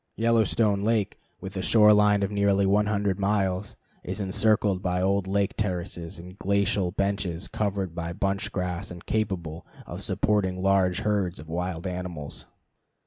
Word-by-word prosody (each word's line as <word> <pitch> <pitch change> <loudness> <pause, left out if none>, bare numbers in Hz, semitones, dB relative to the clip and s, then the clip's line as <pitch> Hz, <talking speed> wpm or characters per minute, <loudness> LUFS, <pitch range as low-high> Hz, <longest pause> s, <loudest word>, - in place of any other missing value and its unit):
Yellowstone 110 -2 +2
Lake, 110 -1 0 0.2
with 95 +1 -7
a 95 - -2
shore 105 +1 +6
line 105 -1 +4
of 100 - -1
nearly 100 -1 +2
100 100 -1 +1
miles, 100 -1 0 0.3
is 95 +3 -4
encircled 100 0 +1
by 90 -1 0
old 95 +1 +1
lake 100 0 0
terraces 90 -5 -3
and 90 +3 -12
glacial 100 -2 +1
benches 100 -2 -2
covered 100 -5 -2
with 85 0 -5
bunch 100 0 -1
grass 90 +1 -3
and 85 -1 -10
capable 90 -7 -2 0.2
of - - -7
supporting 95 -3 0
large 95 -2 +2
herds 100 -4 0
of 75 - -10
wild 85 0 -3
animals. 90 -5 -5
95 Hz, 145 wpm, -26 LUFS, 90-105 Hz, 0.3 s, shore